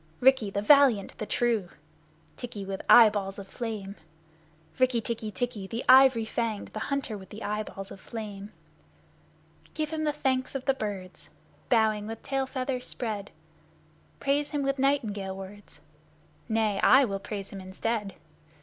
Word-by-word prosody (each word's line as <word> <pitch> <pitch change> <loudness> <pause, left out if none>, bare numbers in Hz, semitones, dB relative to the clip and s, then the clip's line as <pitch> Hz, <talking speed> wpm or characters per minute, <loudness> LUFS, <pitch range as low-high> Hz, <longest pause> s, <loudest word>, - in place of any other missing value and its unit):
Rikki, 260 -5 +4
the 200 +1 -2
valiant, 265 -6 +5
the 215 - -4
true, 230 -7 0 0.7
Tikki, 220 -5 -6
with 195 0 -4
eyeballs 205 -4 +6
of 200 -1 -8
flame, 210 -3 -5 0.8
Rikk 250 -3 +2
tikki 225 -1 -3
tikki, 210 -1 -4
the 230 +4 -5
ivory 255 -3 +7
fanged, 220 -2 -3
the 215 - -6
hunter 280 -6 -2
with 190 -2 -11
eyeballs 205 -2 -4
of - - -9
flame! 210 -2 -7 1.2
Give 310 0 -2
him 315 -1 -2
the 300 - +2
Thanks 265 -3 -1
of 265 - -4
the 270 - +3
Birds, 200 -7 -6 0.4
Bowing 220 -3 +2
with 225 0 -7
tail 270 -1 -1
feathers 255 -1 -3
spread! 210 -4 -4 0.9
Praise 285 +1 +1
him 290 -1 -2
with 275 0 -1
nightingale 210 -9 0
words 195 +2 -11 0.7
Nay, 220 -3 +1
I 265 +1 +7
will 195 -4 -3
praise 200 -1 -6
him 195 - -7
instead. 195 +2 -3
220 Hz, 145 wpm, -28 LUFS, 200-260 Hz, 1.2 s, ivory